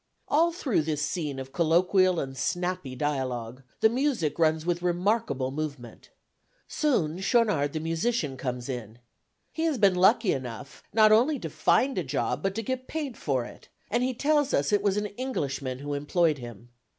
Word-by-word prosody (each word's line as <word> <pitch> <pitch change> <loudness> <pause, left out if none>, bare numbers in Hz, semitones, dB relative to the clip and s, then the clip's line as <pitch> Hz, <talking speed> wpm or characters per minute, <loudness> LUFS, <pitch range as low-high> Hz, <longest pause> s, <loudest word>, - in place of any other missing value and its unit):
All 330 +4 +3
through 280 - 0
this 150 -1 -2
scene 150 -2 -3
of 135 0 -7
colloquial 180 +2 +3
and 135 -1 -4
snappy 175 0 -2
dialogue, 130 -4 -3 0.2
the - - +7
music 240 - 0
runs 160 -1 +2
with 175 0 0
remarkable 180 - 0
movement. 140 -4 -6 0.6
Soon 185 - 0
Schaunard 195 - +2
the 160 - -2
musician 165 - -1
comes 125 -2 -4
in. 120 -4 -6 0.5
He 320 - -5
has 315 -5 +1
been 200 -4 +4
lucky 190 +3 +4
enough 130 +1 -7
not 215 0 +5
only 250 +8 +4
to 165 - -6
find 265 - +2
a - - -1
job 125 -1 -2
but 195 +2 -1
to 225 - -2
get 255 +3 -4
paid 295 -6 -4
for 130 -9 -1
it; - - -13 0.2
and 240 +3 +1
he 255 0 0
tells 290 +2 +2
us 140 +7 0
it 205 - +4
was 200 -1 +1
an 210 - 0 0.2
Englishman 135 - -3
who 145 +2 -5
employed 150 +1 +1
him. 120 -1 -10
165 Hz, 175 wpm, -27 LUFS, 135-220 Hz, 0.6 s, the